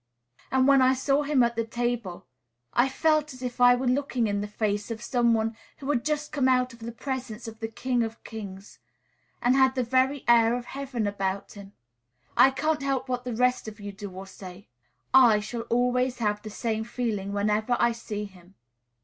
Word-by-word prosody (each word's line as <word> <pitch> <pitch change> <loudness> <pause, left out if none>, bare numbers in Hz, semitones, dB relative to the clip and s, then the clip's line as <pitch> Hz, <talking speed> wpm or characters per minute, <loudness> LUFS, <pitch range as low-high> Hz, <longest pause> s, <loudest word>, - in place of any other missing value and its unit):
And 265 0 +3
when 275 -1 +6
I 260 +1 +4
saw 275 +2 +1
him 285 -3 +3
at 235 0 0
table, 235 -6 -3 0.5
I 245 +3 +3
felt 305 0 +1
as 255 - -11
if 245 0 -4
I 245 0 +7
were 255 +2 -3
looking 255 -1 +1
in 205 -1 -1
the 205 - -3
face 210 0 -2
of 230 -1 -4
some 240 -3 +2
one 225 0 -1 0.2
who 270 - -8
had 245 -5 0
just 300 -1 -2
come 280 -3 +1
out 255 -1 +2
of 230 - -15
the 230 +1 -6
presence 245 -2 -5
of 225 0 -9
the 225 - -3
King 245 +2 -1
of 225 0 -4
kings, 200 -3 -9 0.6
and 245 +2 +4
had 265 -1 +4
the 255 - +1
very 260 +3 +1
air 235 0 +5
of 245 -1 -5
heaven 265 -5 -4
about 195 -1 -2
him. 200 -1 -12 0.6
I 250 +3 +7
can't 295 +3 -1
help 270 -1 -1
what 250 0 -2
the 245 -2 -3
rest 250 0 +1
of 215 0 -8
you 205 0 -6
do 200 0 -8
or 190 +1 -9
say; 190 0 -11 0.5
I 240 -5 +7
shall 230 +2 -6
always 250 +1 +1
have 210 -2 -1
the 215 - -8
same 220 +1 -2
feeling 220 -4 -3
whenever 210 +4 +1
I 235 - +4
see 215 -3 -5
him." 190 -1 -16
240 Hz, 200 wpm, -27 LUFS, 215-260 Hz, 0.6 s, I